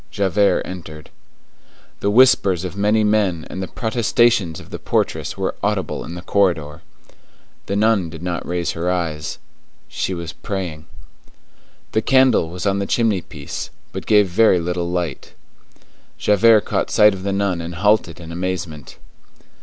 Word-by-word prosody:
Javert 100 0 +1
entered. 80 -4 -9 0.9
The 100 - 0
whispers 100 -6 +4
of 90 0 -5
many 105 +2 +2
men 105 -6 +1
and 95 - -5
the 95 - -3
protestations 115 -6 +1
of - - -14
the - - -6
portress - - -1
were - - -1
audible - - -1
in 85 - -7
the 90 - -8
corridor. 85 -8 0 0.9
The 100 - -2
nun 105 -4 +2
did 80 0 -9
not 90 -1 -3
raise 90 -1 -2
her 85 +2 -2
eyes. 80 -4 -2 0.5
She 95 - -3
was 85 -1 -6
praying. 90 -7 -5 1.0
The 110 - +1
candle 130 -8 +3
was 90 +2 -6
on 100 0 +1
the 100 - -2
chimney 110 -6 +1
piece, 75 -3 -7 0.2
and - - -5
gave 105 -2 +5
but - - -14
very 110 -5 +5
little 85 0 -2
light. 85 -5 -4 0.8
Javert 110 +1 +5
caught - - -1
sight 105 -1 +5
of 95 - -7
the 100 +1 -2
nun 95 -3 0
and 85 +1 -6
halted 100 -2 +1
in 85 -1 -9
amazement. 85 -4 -5
95 Hz, 155 wpm, -20 LUFS, 85-105 Hz, 1.0 s, gave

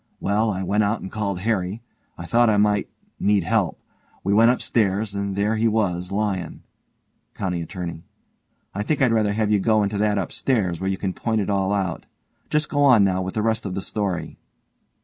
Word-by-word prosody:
Well, 105 +3 +1
I 95 -2 -2
went 105 +3 +1
out 105 +2 0
and 95 - -7
called 100 -4 -2
Harry. 105 0 -1 0.3
I 85 - -7
thought 120 +5 +3
I 105 - +3
might 105 0 +2 0.3
need 100 -2 +2
help. 95 -4 0 0.4
We 100 - +1
went 115 +3 +6
upstairs 105 -4 0
and 100 -1 -3
there 105 +3 +1
he 115 +1 +2
was 95 -5 0
lyin' 100 -5 -2 0.7
COUNTY 90 -3 -2
ATTORNEY: 85 -2 -6 0.7
I 100 - -3
think 140 +7 -1
I'd 125 -4 +3
rather 105 -2 +2
have 105 0 0
you 105 - +4
go 110 +1 +3
into 100 0 -2
that 105 0 +2
upstairs, 95 -2 -1
where 95 - 0
you 95 - -1
can 95 -1 -2
point 110 +2 -1
it 100 - -2
all 95 -1 +1
out. 95 -4 -2 0.4
Just 150 0 +1
go 145 - 0
on 125 -7 +6
now 95 -1 +1
with 95 +1 -5
the 110 - 0
rest 110 0 0
of 95 -3 -4
the 100 - -2
story. 100 -5 -3
100 Hz, 200 wpm, -23 LUFS, 95-110 Hz, 0.7 s, went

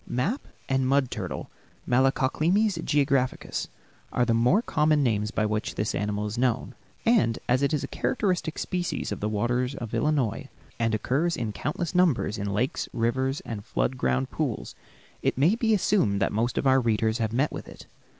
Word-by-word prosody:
Map 135 - -1 0.2
and 135 -1 +1
mud 135 -1 +2
turtle - - -5 0.4
(Malacoclemmys 155 - +2
geographicus) 140 -3 0 0.4
are 125 - +2
the 115 - +2
more 125 - +3
common 150 -5 +2
names 105 -4 +1
by 110 -1 0
which 105 0 -2
this 105 - -1
animal 105 +1 -1
is 105 +3 -4
known; 125 -2 0 0.3
and 220 - +3
as 125 +2 +3
it 140 - +2
is 150 -3 0
a - - -3
characteristic 180 -9 -1
species 180 -1 -2
of - - -3
the 105 - -1
waters 120 +5 0
of 115 -2 -6
Illinois 145 -8 0 0.3
and 115 -1 +1
occurs 150 +10 0
in 115 -3 -2
countless 155 - -3
numbers 165 - +2
in 100 0 -2
lakes, 115 +6 -1
rivers, 130 +4 0
and 105 -3 -6
flood 130 - -1
ground 65 - 0
pools, - - -3 0.5
it - - 0
may 155 +9 +4
be 225 -1 +1
assumed 185 - +2
that 100 - +1
most 115 +3 0
of - - 0
our 135 0 +5
readers 110 -1 +1
have 110 -1 0
met 135 +6 +1
with - - -7
it. - - -12
130 Hz, 180 wpm, -26 LUFS, 110-150 Hz, 0.5 s, our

